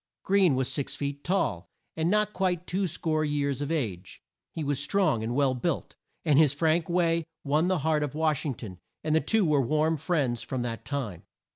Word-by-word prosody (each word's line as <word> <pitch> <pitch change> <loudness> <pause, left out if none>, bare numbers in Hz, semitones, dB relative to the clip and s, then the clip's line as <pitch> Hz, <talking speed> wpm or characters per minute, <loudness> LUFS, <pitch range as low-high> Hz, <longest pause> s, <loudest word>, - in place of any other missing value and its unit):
Greene 190 -7 +4
was 130 -1 0
six 140 - -2
feet 140 0 -4
tall, 135 - -1 0.3
and 160 +1 0
not 210 +1 +2
quite 180 -2 0
two 190 +2 -1
score 160 -1 -1
years 145 -2 -1
of 145 +2 -2
age. 105 - -3 0.3
He 160 - -4
was 140 -1 -1
strong 180 - +1
and 120 +2 -2
well 140 -2 +3
built, 150 +7 -2 0.3
and 150 -3 +5
his 150 -3 +5
frank 160 +2 +1
way 170 -1 +2 0.2
won 150 +4 +2
the 185 0 +2
heart 155 -1 +2
of 150 -1 -3
Wash 155 -2 +1
ing 140 -5 -2
ton, 95 -7 -9 0.2
and 155 0 0
the 160 - +4
two 220 -3 +2
were 150 -3 +3
warm 155 +5 +1
friends 135 -7 0
from 130 -2 -3
that 115 -2 -5
time. 125 - -4
150 Hz, 200 wpm, -28 LUFS, 135-170 Hz, 0.3 s, and